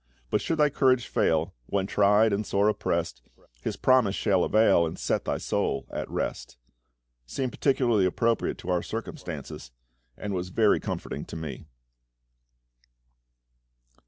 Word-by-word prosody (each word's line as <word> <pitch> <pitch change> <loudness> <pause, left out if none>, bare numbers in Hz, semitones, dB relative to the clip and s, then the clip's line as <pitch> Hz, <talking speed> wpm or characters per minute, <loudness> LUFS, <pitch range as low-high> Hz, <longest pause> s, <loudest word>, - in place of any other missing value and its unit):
But - - +2
should 165 - -1
thy 150 -1 +3
courage 130 -3 +3
fail, 80 +3 +1
when 100 -1 0
tried 105 +2 +3
and 100 +2 0
sore 100 0 +1
oppressed, 105 - -1 0.4
His - - -3
promise 125 -7 +3
shall 95 -4 +2
avail, 110 -5 +4
and 80 - -3
set - - -1
thy - - -1
soul 70 - -1
at - - -4
rest." - - -4 0.7
seemed 130 - -3
particularly 120 -8 +2
appropriate 115 +5 0
to 90 - -5
our 90 -1 +1
circumstances, 60 - -7 0.5
and 105 -1 -4
was 90 -1 -3
very 105 +3 +3
comforting - - -5
to - - -9
me. 80 -5 -6
100 Hz, 135 wpm, -27 LUFS, 90-115 Hz, 0.7 s, avail